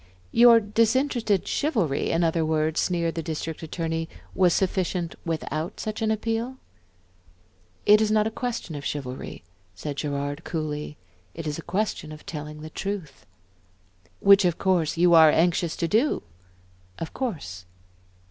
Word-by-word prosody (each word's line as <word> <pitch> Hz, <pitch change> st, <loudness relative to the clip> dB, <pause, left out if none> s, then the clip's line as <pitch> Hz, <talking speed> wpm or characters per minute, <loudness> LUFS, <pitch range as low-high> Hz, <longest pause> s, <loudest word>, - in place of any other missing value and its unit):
"Your 235 Hz, -1 st, +7 dB
disinterested 225 Hz, 0 st, +1 dB
chivalry, 215 Hz, -, 0 dB
in 165 Hz, +1 st, +1 dB
other 165 Hz, 0 st, +2 dB
words," 155 Hz, 0 st, +1 dB
sneered 170 Hz, -2 st, 0 dB
the 165 Hz, -, -3 dB
District 160 Hz, 0 st, -4 dB
Attorney, 165 Hz, 0 st, -3 dB, 0.2 s
"was 180 Hz, -2 st, +4 dB
sufficient, 180 Hz, -2 st, 0 dB
without 160 Hz, 0 st, -3 dB
such 215 Hz, 0 st, -4 dB
an 220 Hz, -, +1 dB
appeal?" 225 Hz, +3 st, -1 dB, 1.3 s
"It 210 Hz, +1 st, +7 dB
is 215 Hz, -, +2 dB
not 215 Hz, 0 st, +3 dB
a 220 Hz, -, -1 dB
question 235 Hz, -7 st, -4 dB
of 145 Hz, -1 st, -6 dB
chivalry," 135 Hz, -8 st, -5 dB, 0.3 s
said 145 Hz, +10 st, -5 dB
Gerard, 145 Hz, +1 st, -3 dB
coolly, 150 Hz, -2 st, -4 dB, 0.4 s
"it 165 Hz, -, -6 dB
is 150 Hz, +1 st, -3 dB
a -, -, -5 dB
question 185 Hz, -3 st, -2 dB
of 155 Hz, 0 st, -11 dB
telling 150 Hz, -1 st, -7 dB
the 155 Hz, 0 st, -8 dB
truth." 185 Hz, -, -5 dB, 0.9 s
"Which 200 Hz, 0 st, +7 dB
of 175 Hz, -2 st, +1 dB
course 175 Hz, -5 st, +1 dB
you 175 Hz, 0 st, +5 dB
are 160 Hz, -1 st, +9 dB
anxious 170 Hz, +1 st, +2 dB
to 170 Hz, -, -1 dB
do." 230 Hz, -, +2 dB, 0.7 s
"Of 165 Hz, -, -6 dB
course." 145 Hz, -, -4 dB
170 Hz, 145 wpm, -25 LUFS, 155-210 Hz, 1.3 s, are